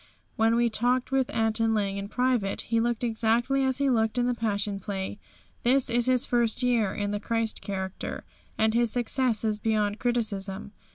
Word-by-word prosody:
When 225 +1 +3
we 235 0 +3
talked 245 +3 0
with 265 -2 +1
Anton 225 0 +1
Lang 200 -2 -1
in 200 0 -4
private 245 -3 0
he 230 0 0
looked 235 0 -1
exactly 235 +4 +1
as 260 -1 +1
he 280 0 +1
looked 225 -2 +1
in 245 - +2
the 245 - +1
Passion 205 -3 -2
Play. 195 0 -5 0.4
This 250 0 +3
is 240 +1 +2
his 255 -1 +3
first 240 0 +1
year 235 -5 +2
in 205 0 -3
the 205 - -2
Christ 225 +1 -1
character, 190 -2 -5 0.3
and 220 0 +2
his 235 0 +2
success 245 0 0
is 215 -1 0
beyond 210 -1 0
criticism. 210 -5 -1
225 Hz, 180 wpm, -27 LUFS, 210-245 Hz, 0.4 s, When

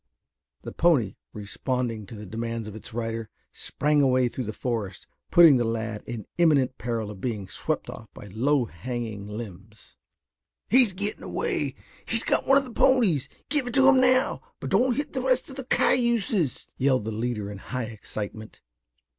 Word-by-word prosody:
The - - -6
pony, 145 - +2
responding 110 +1 -3
to 115 - -9
the 105 0 -8
demands 115 +2 -4
of 105 - -8
its 110 - -9
rider, 115 -1 -3 0.2
sprang 150 0 0
away 130 -2 +3
through 125 +1 -5
the 110 - -3
forest, 110 -5 -4 0.2
putting 165 -6 +8
the 120 - +1
lad 115 -2 -3
in 115 -3 -5
imminent 140 -6 +3
peril 115 -3 -3
of 95 -3 -11
being 105 -6 -3
swept - - -3
off - - -9
by - - -11
low 135 +3 +2
hanging 110 +2 -5
limbs. 105 -1 -10 0.7
"He's 245 -3 +5
getting 205 +3 -4
away. - - -2 0.3
He's - - +2
got - - +1
one 275 - +6
of 275 - +1
the 250 - -9
ponies. 225 - +3 0.2
Give 290 -4 +1
it 245 - -4
to 270 -1 +6
him 270 -1 +6
now, 255 +1 +3 0.2
but - - -5
don't 245 +5 +3
hit 290 - -3
the 260 - -1
rest 255 +1 +1
of - - -9
the 270 -2 -6
cayuses!" 235 - +2
yelled 130 -5 +2
the 110 - -2
leader 110 -2 -3
in 100 - -8
high 125 +4 -4
excitement. 110 -1 -7
120 Hz, 175 wpm, -26 LUFS, -, 0.7 s, putting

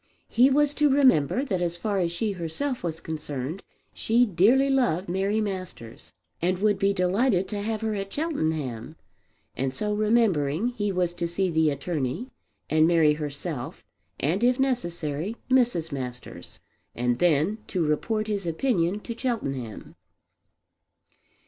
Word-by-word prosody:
He 250 +3 +5
was 290 +1 +3
to 295 0 +3
remember 260 - +4
that 190 -10 -2
as 175 -1 0
far 200 +2 -1
as 170 -2 0
she 210 +5 -1
herself 195 - -3
was 160 -2 -2
concerned, 150 +1 -5 0.3
she 235 +2 +3
dearly 220 - +4
loved 245 -10 +1
Mary 195 +4 0
Masters 185 - -5 0.3
and 180 +2 +1
would 205 0 +1
be 195 0 +3
delighted 190 +1 +1
to 205 -2 -3
have 220 +1 -2
her 220 -1 -1
at 195 -1 -4
Cheltenham; 155 - -2 0.6
and, 130 0 -2
so 210 +7 0
remembering, 210 - +2
he 205 -5 -2
was 180 -2 0
to 175 -1 -2
see 180 +2 0
the 160 -1 +3
attorney, 145 - -3 0.4
and 155 +1 +4
Mary 165 -3 +4
herself, 150 -2 -5 0.3
and 170 - 0
if 250 +1 +3
necessary 180 - -1
Mrs. 235 -11 +2
Masters; 125 -3 -6 0.4
and 120 0 0
then 175 +5 +2
to 180 -5 -1
report 215 +9 0
his 205 -4 -3
opinion 180 +1 0
to 235 - -6
Cheltenham. 135 - -4
185 Hz, 145 wpm, -26 LUFS, 155-225 Hz, 0.6 s, He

